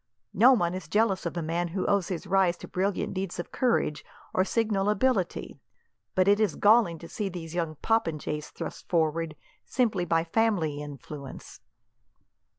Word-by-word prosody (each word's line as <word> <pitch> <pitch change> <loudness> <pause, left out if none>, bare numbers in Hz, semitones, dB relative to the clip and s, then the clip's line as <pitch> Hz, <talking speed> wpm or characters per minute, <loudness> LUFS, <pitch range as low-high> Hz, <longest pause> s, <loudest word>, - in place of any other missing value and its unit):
No 235 +7 +7
one 175 -7 +1
is 185 - -6
jealous 210 -4 +1
of 170 - -5
a 170 - -1
man 170 +2 -1
who 185 +3 -3
owes 200 -3 +2
his 180 0 -4
rise 185 -2 +2
to - - -10
brilliant 195 +2 -1
deeds 190 -2 -3
of 175 - -5
courage, 230 - +1 0.3
or 185 - +3
signal 210 -1 0
ability; 210 -4 0 0.6
but 185 0 +3
it 205 +1 +5
is 215 -6 +1
galling 210 -5 +4
to 165 - -10
see 205 +2 -3
these 170 -3 -7
young 165 -3 -2
popinjays 155 -8 0
thrust - - -8
forward, 165 -1 0 0.3
simply 215 -8 0
by 165 -1 +2
family 170 -6 0
influence." 145 -1 -9
180 Hz, 160 wpm, -28 LUFS, 165-205 Hz, 0.6 s, No